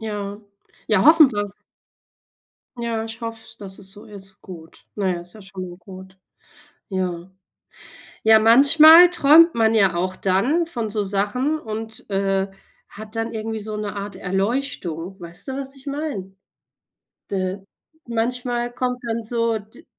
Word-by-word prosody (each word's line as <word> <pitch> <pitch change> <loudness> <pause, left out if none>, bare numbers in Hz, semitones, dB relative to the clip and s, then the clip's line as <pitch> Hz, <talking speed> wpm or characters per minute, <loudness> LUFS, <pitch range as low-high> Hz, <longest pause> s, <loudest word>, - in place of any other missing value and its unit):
Ja. 205 -2 -5 0.5
Ja, 215 0 +3
hoffen 315 -2 +7
wir's. 205 -1 -5 1.1
Ja, 230 -1 -2
ich 225 +1 -9
hoff 230 0 -5
‘s, - - -13
dass 195 -2 -9
es 190 -1 -8
so 205 +1 -11
ist. 195 -2 -12
Gut. 165 -3 -13
Na 200 -3 -1
ja, 175 -1 -3
ist 175 +3 -11
ja 215 - -13
schon 190 -1 -8
mal 175 - -11
gut. 190 0 -13 0.7
Ja. 185 -2 -4 0.9
Ja, 220 0 +6
manchmal 305 +9 +8
träumt 330 +1 +6
man 225 -1 +2
ja 195 -5 +3
auch 185 +2 -2
dann 245 - +1
von 235 -9 -4
so 210 0 -1
Sachen 210 +10 -1
und, 220 -2 -7
äh, 195 0 0 0.4
hat 215 +1 -11
dann 225 +1 -2
irgendwie 220 0 -4
so 210 0 -5
‘ne 210 -1 -5
Art 200 0 -6
Erleuchtung. 190 - -3
Weißt 170 +8 -12
du, 265 - -4
was 270 0 -7
ich 270 +1 -17
meine? 275 -10 -5 1.0
De 190 0 -3 0.4
manchmal 240 +1 -2
kommt 250 0 -2
dann 230 0 -2
so 230 0 0
d 210 +1 -16
215 Hz, 155 wpm, -22 LUFS, 195-240 Hz, 1.1 s, manchmal